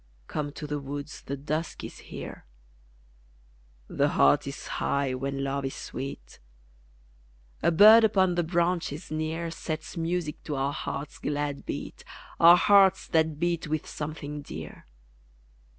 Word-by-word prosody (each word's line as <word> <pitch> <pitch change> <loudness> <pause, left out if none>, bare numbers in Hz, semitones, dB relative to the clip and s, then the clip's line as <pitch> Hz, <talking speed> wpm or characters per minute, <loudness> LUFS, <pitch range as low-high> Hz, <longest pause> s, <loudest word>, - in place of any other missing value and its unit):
Come 145 -1 -3
to 150 - -7
the 150 0 -3
woods, 145 +1 -7
the 140 - -5
dusk 155 +4 -3
is - - -8
here - - -9 1.4
The - - +1
heart - - +4
is - - -6 0.2
high 140 -2 0
when 135 +1 -3
LOVE 140 0 -2
is 135 - -4
sweet 130 - -7 1.2
A - - +3
bird 215 +7 +8
upon 190 -4 +3
the 175 - +1
branches 170 -2 -1
near 160 +2 -2
Sets 160 -1 -5
music 165 -2 -2
to 150 - -3
our 135 +1 -1
hearts' 140 +1 -5
glad 145 -1 -3
beat, - - -6 0.4
Our 170 +1 +9
hearts 195 +1 +5
that 160 -2 +1
beat 170 -1 0
with 155 0 -2
something 150 -1 -6
dear. - - -9
155 Hz, 135 wpm, -27 LUFS, 145-170 Hz, 1.4 s, Our